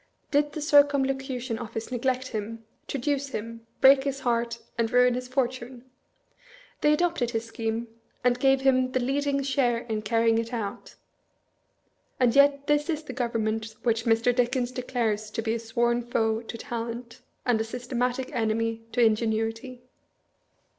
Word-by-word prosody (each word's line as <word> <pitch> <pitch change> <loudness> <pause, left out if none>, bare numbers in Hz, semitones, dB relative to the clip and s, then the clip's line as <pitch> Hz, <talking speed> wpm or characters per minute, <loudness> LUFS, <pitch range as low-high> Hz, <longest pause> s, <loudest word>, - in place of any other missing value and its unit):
Did 290 0 +2
the 310 - -4
Circumlocution 270 -5 +2
Office 225 0 -6
neglect 255 +1 -1
him, 225 +1 -5 0.2
traduce 280 +1 -1
him, 230 -2 -7
break 270 0 +7
his 275 -1 -3
heart, 235 -2 0 0.2
and 230 -1 0
ruin 250 0 +5
his 250 +1 -4
fortune? 255 -1 -3 1.0
They 300 - +4
adopted 330 -6 +1
his 225 -1 -2
scheme, 230 0 -3 0.4
and 245 0 +2
gave 270 0 +3
him 255 -1 +2
the 255 - +2
leading 275 +2 0
share 260 -3 +1
in 225 -2 -3
carrying 225 +1 +2
it 230 +1 -4
out, 210 -4 -5 1.2
and 245 -1 +3
yet 280 0 +5
this 295 +1 +1
is 315 -1 -1
the 260 - -7
government 225 -3 -2
which 225 -2 +1
Mr. 230 +1 +3
Dickens 245 0 +1
declares 235 -4 -2
to 225 +1 -4
be 225 0 0
a 230 - -2
sworn 235 +1 0
foe 225 -2 0
to 230 0 -7
talent, 235 +1 -6 0.2
and 235 -3 +2
a - - +1
systematic 250 +2 -2
enemy 225 0 0
to 245 - +2
ingenuity." 225 +3 0
245 Hz, 150 wpm, -27 LUFS, 225-265 Hz, 1.2 s, break